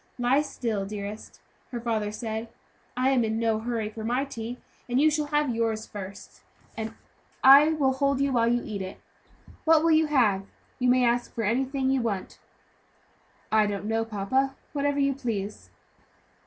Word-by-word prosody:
"Lie 250 +3 +3
still, 230 -8 -3
dearest," 205 +1 -7 0.3
her 240 - -3
father 220 -3 -1
said. 220 +1 -4 0.5
"I 255 +1 +3
am 255 -3 +3
in 220 0 -1
no 225 -1 +1
hurry 225 -1 -2
for 220 +1 -7
my 245 +5 0
tea, 240 -2 -6 0.3
so 245 - -6
you 305 +4 +5
shall 300 -1 -1
have 295 -3 +1
yours 225 -1 -1
first, 200 -1 -9 0.3
and 220 0 -5 0.5
I 280 +4 +8
will 275 -4 +2
hold 275 0 +1
you 280 0 +1
while 235 -1 +3
you 240 0 +1
eat 205 -3 -4
it. 190 0 -7 0.6
What 320 -1 +5
will 330 - +4
you 315 0 +4
have? 210 -9 +2 0.3
You 250 -1 +2
may 250 0 +4
ask 240 +1 +1
for 230 - -2
anything 265 +4 0
you 270 -1 +2
want." 205 -5 -3 1.1
"I 215 -1 +4
don't 205 0 -3
know, 225 +1 0
papa; 225 +6 -1 0.2
whatever 285 -1 0
you 275 -1 +2
please." 215 -6 -4
240 Hz, 170 wpm, -27 LUFS, 220-270 Hz, 1.1 s, I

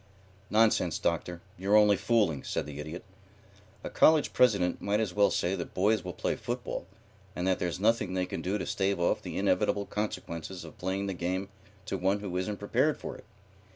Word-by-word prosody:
"Nonsense, 105 -6 +3
Doctor. 85 +1 -2 0.2
You're 100 +3 +4
only 105 -1 +6
fooling," 100 - +1
said - - -2
the 75 -1 -8
Idiot. 80 +4 -6 0.8
"A - - -4
college 155 -1 +4
president 100 -8 +3
might 100 +1 +1
as 105 -5 -1
well 100 +1 +4
say 90 - 0
that 85 -3 -6
boys 105 +1 +2
will 90 - -4
play - - -1
football, - - -4 0.5
and 90 - -2
that 95 -1 +2
there's 90 0 -2
nothing 105 -3 +1
they 90 0 +1
can - - -5
do 95 +3 -1
to - - -4
stave 100 -1 0
off 85 - +1
the - - -6
inevitable 100 0 +1
consequences 95 -4 -4
of - - -13
playing 95 +2 -2
the 100 - -2
game 95 +2 -2 0.4
to 95 -2 -3
one 95 +3 +1
who 95 -3 -5
isn't 95 +3 -2
prepared - - +1
for - - -6
it. - - -14
95 Hz, 190 wpm, -29 LUFS, 90-105 Hz, 0.8 s, only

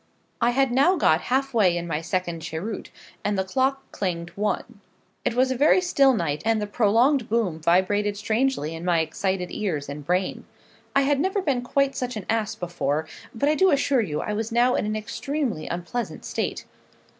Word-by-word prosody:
I 235 - +4
had 265 +1 +2
now 280 +9 +4
got 160 - +3
half 270 +1 +1
way 190 -7 +3
in 170 - -3
my 160 -2 -2
second 175 -1 -2
cheroot, 165 +7 -5 0.3
and 205 -1 0
the 190 - +1
clock 265 +7 0
clanged 170 -3 -3
'one.' 210 +2 -3 0.4
It 235 - 0
was 260 +1 +3
a - - 0
very 295 +8 +5
still 280 -8 +4
night, 155 -6 -1
and 225 -1 +2
the 210 - -1
prolonged 230 +5 +2
boom 210 -8 0
vibrated 200 +5 +2
strangely 220 - 0
in 165 +1 -7
my 175 -2 +2
excited 180 +3 -2
ears 165 -9 -2
and 145 +1 -6
brain. 180 +5 -1 0.5
I 275 - +5
had 280 0 +2
never 380 +6 +1
been 280 -9 0
quite 275 +2 +1
such 250 -1 -3
an 200 - -6
ass 220 -2 -1
before; 160 -3 -2 0.3
but 255 +6 0
I 300 - +4
do 380 +4 +4
assure 280 -3 +3
you 155 -8 -2
I 210 - -3
was 220 +2 -3
now 240 +2 +3
in - - 0
an 215 - -1
extremely 235 - -3
unpleasant 180 +8 -4
state. - - -3
215 Hz, 190 wpm, -24 LUFS, 175-265 Hz, 0.5 s, very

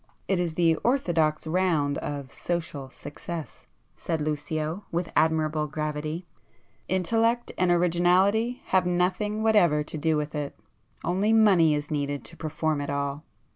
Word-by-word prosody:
"It 190 -2 +1
is 170 -3 -1
the 165 -2 +3
orthodox 165 - +1
round 160 -4 +1
of 140 -2 -5
social 160 -6 -4
success," 150 +4 -8 0.3
said 165 -2 -3
Lucio 155 +4 -2
with 170 0 -2
admirable 155 -1 +2
gravity—"Intellect 175 +8 -2
and 180 0 +1
originality 180 +7 +3
have 185 -1 +3
nothing 185 +5 0
whatever 175 -9 +4
to 155 - -7
do 160 +1 +2
with 150 0 -3
it,—only 145 - -3
money 190 -8 +5
is 145 0 -4
needed 145 -1 -2
to 170 - -9
perform 155 -1 -2
it 145 - -4
all." 140 +1 -2
160 Hz, 130 wpm, -26 LUFS, 150-180 Hz, 0.3 s, money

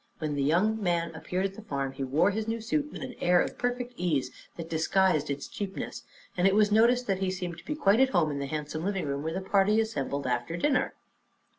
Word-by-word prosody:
When 155 -2 -2
the 145 - -1
young 190 +10 +2
man 170 -3 0
appeared 180 +3 -2
at 195 - -2
the 220 - -10
farm 140 -9 -3
he 135 0 -5
wore 150 +9 +2
his 215 +2 -3
new 225 +1 -1
suit 285 +7 -1
with - - -7
an 255 -1 -6
air 175 0 +4
of - - -2
perfect 245 0 -2
ease 145 -8 0 0.3
that 165 -1 -6
disguised 165 -1 +2
its 140 0 -3
cheapness, 195 -2 -5 0.3
and 180 +1 +3
it 195 - +3
was 210 -1 +4
noticed 240 +3 +4
that 195 -3 0
he 190 -1 0
seemed 180 -2 -5 0.2
quite 205 -2 +4
at 265 0 +5
home 170 - +2
in 140 - -3
the 140 - -3
handsome 155 +1 -4
living 195 -2 -1
room, 140 0 -2
where 160 +2 -2
the 190 - -2
party 200 +3 +3
assembled 140 -10 -2
after 125 +6 -1
dinner. 265 +8 +1
180 Hz, 230 wpm, -28 LUFS, 150-215 Hz, 0.3 s, at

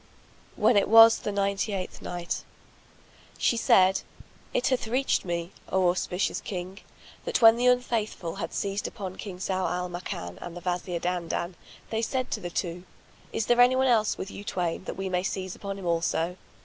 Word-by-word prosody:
When 225 - +4
it 200 - +3
was 225 +1 +9
the 210 - -3
Ninety 200 +1 0
eighth 185 -2 -5
Night, 175 -1 -4 0.9
She - - +2
said, 190 -4 +4 0.5
It - - +1
hath 255 -4 0
reached 255 0 +1
me, 170 0 -3 0.2
O 185 -1 +3
auspicious 180 +1 -1
King, 185 +1 -6 0.4
that - - 0
when 225 0 +9
the 245 +1 +1
Unfaithful 230 -8 0
had - - -4
seized 200 0 -2
upon 190 -2 -7
King 195 -4 -7
Zau 185 0 -1
al 180 0 -2
Makan 175 0 -6
and 175 0 -7
the - - -8
Wazir 180 -1 -2
Dandan, 175 0 -2 0.4
they 225 0 0
said 255 +2 -2
to - - -1
the 175 -3 -5
two, 175 0 -3 0.5
"Is 220 - -1
there 240 0 +4
anyone 255 +2 +5
else 225 -4 +3
with 190 - -6
you 205 - -8
twain, 180 -2 -2
that - - -5
we 195 0 -3
may 180 -1 0
seize 185 -1 -3
upon 200 -1 -6
him 195 - -8
also?" 170 0 0
190 Hz, 180 wpm, -27 LUFS, 180-220 Hz, 0.9 s, was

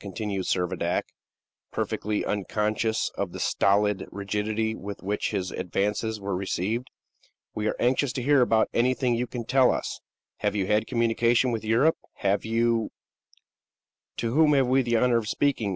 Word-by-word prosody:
continued 100 0 -4
Servadac, 90 -1 0 0.7
perfectly 105 0 -2
unconscious 105 +2 -1
of 100 -3 -3
the - - -6
stolid 100 0 +2
rigidity 105 +2 -2
with 100 -1 -8
which 105 +2 -1
his 95 -3 -2
advances 105 +4 -2
were 100 -1 -3
received. 100 +6 -2 0.7
"We 105 0 -2
are - - 0
anxious 130 +2 +2
to 125 - -3
hear 140 -1 +5 0.3
anything 125 +1 +2
you 120 +1 -1
can 120 -2 -6
tell 130 +1 +4
us. - - -3 0.4
Have - - -1
you 100 -2 0
had 105 +2 +1
communications 115 +1 +2
with 110 - -3
Europe? 120 +9 +3 0.2
Have 100 0 0
you 115 0 +1 0.6
" - - -61
"To 115 0 -2
whom 150 +1 +5
have 135 -2 +4
we 130 +2 +3
the 120 -2 0
honor 120 0 +3
of 110 -2 -2
speaking?" 135 -7 0
110 Hz, 155 wpm, -26 LUFS, 100-120 Hz, 0.7 s, hear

